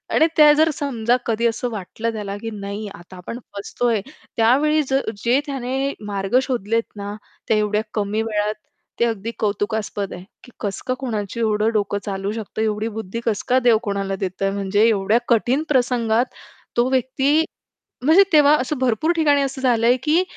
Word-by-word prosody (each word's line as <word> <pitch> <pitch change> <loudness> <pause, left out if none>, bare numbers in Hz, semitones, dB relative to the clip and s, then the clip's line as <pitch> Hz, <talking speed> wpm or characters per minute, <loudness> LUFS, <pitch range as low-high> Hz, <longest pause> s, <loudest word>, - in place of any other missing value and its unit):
आणि 320 - +5
त्या 300 -1 +8
जर 315 +2 +4
समजा 245 -5 0
कधी 230 +1 +1
असं 235 +2 -2
वाटलं 220 +3 -4
त्याला, 200 -2 -4
की 225 +2 -5
नाही 205 0 -5
आता 180 +2 -13
आपण 230 +7 -7 0.2
फसतोय 225 +2 -1 0.4
त्यावेळी 285 +7 +4
जर 270 -3 0 0.2
जे 245 +4 +4
त्याने 270 0 -2
मार्ग 200 +3 0
शोधलेत 230 -3 0
ना, 205 0 -5 0.3
त्या 220 - +3
एवढ्या 210 0 +1
कमी 210 +1 -1
वेळात 210 -1 -1 0.5
ते 235 - +4
अगदी 225 0 -2
कौतुकास्पद 205 -1 -2
आहे, 180 - -8 0.2
की 245 - -15
कसं 200 -3 -3
का 255 - +1
कोणाची 220 -4 -3
एवढं 215 -1 +2
डोकं 205 -1 0
चालू 195 0 -3
शकतं? 220 -1 -5
एवढी 215 0 0
बुद्धी 220 +1 -4
कस 215 -3 0
का 255 +1 +5
देव 225 -2 +6
कोणाला 200 -2 -2
देतय? 195 0 -2
म्हणजे 200 +1 +1
एवढ्या 215 +1 +2
कठीण 245 +6 +2
प्रसंगात 245 -3 +2 0.5
तो 245 +2 +3
व्यक्ती, 265 +4 +2 0.6
म्हणजे 330 +6 +7
तेव्हा 295 0 +7
असं 270 +3 -2
भरपूर 260 +6 +1
ठिकाणी 290 -3 +3
असं 270 -1 -3
झालंय, 240 -1 +3
की 315 +5 +3
225 Hz, 170 wpm, -21 LUFS, 205-260 Hz, 0.6 s, त्या